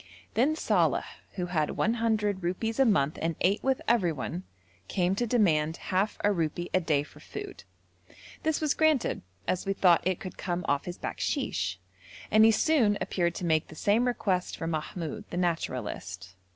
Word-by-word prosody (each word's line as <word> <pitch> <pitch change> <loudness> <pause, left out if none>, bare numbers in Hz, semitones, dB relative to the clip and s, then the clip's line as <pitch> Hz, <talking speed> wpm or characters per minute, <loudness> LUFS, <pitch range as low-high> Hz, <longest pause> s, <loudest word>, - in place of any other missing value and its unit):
Then 275 +7 +3
Saleh, - - +2 0.3
who 180 - -2
had 160 -4 -1
100 220 -3 +1
rupees 200 +7 -2
a 270 - +6
month 150 - +2
and 165 0 0
ate 195 +4 +2
with 265 -1 +1
everyone, 165 - 0 0.4
came 180 0 +1
to 240 +5 -1
demand 165 -9 +2
half 195 +3 -1
a 205 - +4
rupee 170 0 -2
a 185 - +4
day 150 -4 +1
for 150 0 -16
food; 405 - -8 0.8
this 315 -1 0
was 305 -2 +1
granted, 315 -5 +2 0.3
as 185 +1 -1
we 195 - +2
thought 180 -4 +5
it 185 -1 0
could 185 - -8
come 175 -1 -2
off 145 0 +1
his 175 0 -5
bakshish, 95 +1 -2 0.5
and 215 +1 +7
he 225 - +7
soon 225 -4 +3
appeared 170 -2 0
to 180 - -4
make 160 -2 +2
the 160 - -12
same 215 +9 +2
request 190 -7 -1
for 165 - -4
Mahmoud, 160 0 -4
the 175 - -5
naturalist. 105 - -3
180 Hz, 170 wpm, -29 LUFS, 160-220 Hz, 0.8 s, and